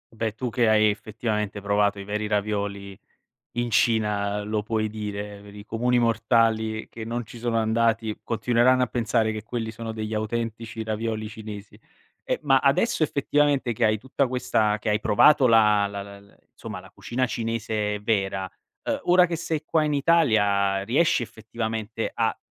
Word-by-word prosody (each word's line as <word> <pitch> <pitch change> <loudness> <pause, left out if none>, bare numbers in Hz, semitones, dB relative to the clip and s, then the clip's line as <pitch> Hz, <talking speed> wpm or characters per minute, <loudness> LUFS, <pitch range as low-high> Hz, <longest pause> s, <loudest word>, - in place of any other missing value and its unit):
Beh, 110 -1 -2
tu 125 +1 -3
che 115 -1 +2
hai 110 0 +5
effettivamente 105 -1 -3
provato 100 0 +1
i - - -6
veri 105 +2 -3
ravioli 100 -2 -2 0.6
in 120 0 -1
Cina 105 -3 +1
lo 105 0 -2
puoi 110 0 -1
dire, 105 -1 -6
per 100 0 -13
i 105 0 -10
comuni 125 +3 +1
mortali 115 -1 +1
che 115 - -8
non 115 +1 -4
ci 120 - -12
sono 115 -1 0
andati, 110 -1 +1
continueranno 120 +2 +2
a - - +3
pensare 115 -1 0
che 110 -1 -5
quelli 110 0 -4
sono 115 0 -6
degli 110 0 -4
autentici 115 +1 -3
ravioli 110 0 -3
cinesi. 105 -2 -9 0.5
Eh, - - -1
ma 135 -3 +4
adesso 140 - +2
effettivamente 140 -3 +1
che 115 - 0
hai 110 0 +3
tutta 130 +4 -1
questa 110 -4 0
che 110 - -4
hai 105 0 +2
provato 130 +7 +5
la 105 -3 +5
la 100 0 -6
la 100 0 -11
l 100 0 -22 0.2
somma, - - -7
la - - -15
cucina 130 +2 -2
cinese 110 -2 -2
vera, 95 -3 -1 0.3
ehm, - - -2
ora 180 0 +5
che 170 -1 -3
sei 160 -2 -3
qua 155 0 +1
in 150 - 0
Italia 105 -11 +3
riesci 130 +5 +2
effettivamente 110 -1 -4
a - - 0
110 Hz, 170 wpm, -25 LUFS, 105-120 Hz, 0.6 s, hai